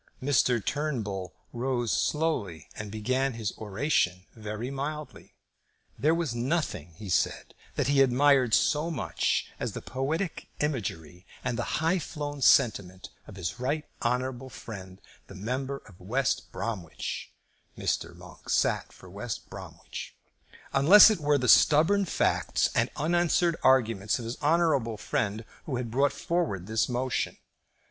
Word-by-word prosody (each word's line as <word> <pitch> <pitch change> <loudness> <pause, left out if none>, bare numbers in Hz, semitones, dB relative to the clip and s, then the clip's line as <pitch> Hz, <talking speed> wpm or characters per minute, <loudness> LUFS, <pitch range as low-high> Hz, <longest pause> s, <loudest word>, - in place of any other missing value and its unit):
Mr. 130 -4 +2
Turnbull 110 - -2 0.2
rose 120 -1 -1
slowly 130 - -1
and 105 -1 -6
began 130 +5 0
his 110 -2 -4
oration 100 -4 0
very 110 +3 -5
mildly. 150 +2 -6 0.6
"There 150 +8 +2
was 165 -7 -1
nothing," 120 - -2
he 105 +2 -9
said, 90 - 0 0.2
"that - - 0
he 140 +1 +4
admired 130 -2 +4
so 155 +2 +2
much 155 -7 -1
as - - -3
the - - -5
poetic 150 +7 -3
imagery 95 - -3 0.2
and 125 -2 -1
the - - -2
high 165 +4 +2
flown 145 -2 -5
sentiment 100 -6 +3 0.2
of 105 - -11
his 95 +4 -4
right 145 +4 -1 0.2
honourable 125 +2 -1
friend 95 -6 -9 0.3
the 95 - -11
member 130 +7 -3
for 90 -4 -17
West 125 +7 -1
Bromwich," 95 -8 -5 0.5
Mr. - - -2
Monk - - -14
sat - - +1
for - - -15
West 105 +5 -6
Bromwich, - - -8 0.6
"unless 185 +11 +9
it 210 - -1
were 145 -1 +3
the 125 -2 -1
stubborn 165 - +5
facts - - +1
and 120 +1 +2
unanswered 170 +2 +2
arguments 115 -6 +3
of 120 - -6
his 115 +5 -6
honourable 150 -8 +2
friend 105 +1 -2 0.2
who 140 - -2
had 120 -2 -3
brought 135 +3 +3
forward 165 - -2
this 110 +4 0
motion." 125 +1 -1
125 Hz, 140 wpm, -28 LUFS, 105-150 Hz, 0.6 s, unless